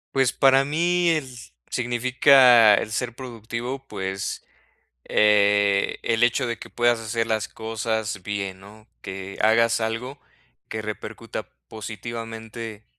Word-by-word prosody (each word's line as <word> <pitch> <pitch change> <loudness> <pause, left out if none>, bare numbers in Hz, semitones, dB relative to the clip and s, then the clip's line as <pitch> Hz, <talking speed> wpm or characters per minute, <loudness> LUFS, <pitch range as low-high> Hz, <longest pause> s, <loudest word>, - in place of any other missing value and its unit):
Pues, 135 -2 +2
para 135 0 +4
mí 175 +4 +1
z 125 - -13 0.2
significa 125 -2 +5
el 105 - -3
ser 120 +1 -3
productivo, 125 +2 -6
pues, 95 -1 -4 0.6
eh, 100 -1 +3
el 115 0 0
hecho 120 +2 +2
de 115 -1 -4
que - - -10
puedas 120 -1 +1
hacer 115 +1 -2
las 110 -1 -1
cosas 110 -2 -3
bien, 100 -1 -4
¿no? 105 +3 -16
Que 95 0 -7
hagas 115 +1 +3
algo 120 +5 -4 0.5
que 110 0 -5
repercuta 110 0 -7 0.2
positivamente, 115 0 -7
115 Hz, 120 wpm, -23 LUFS, 105-125 Hz, 0.6 s, significa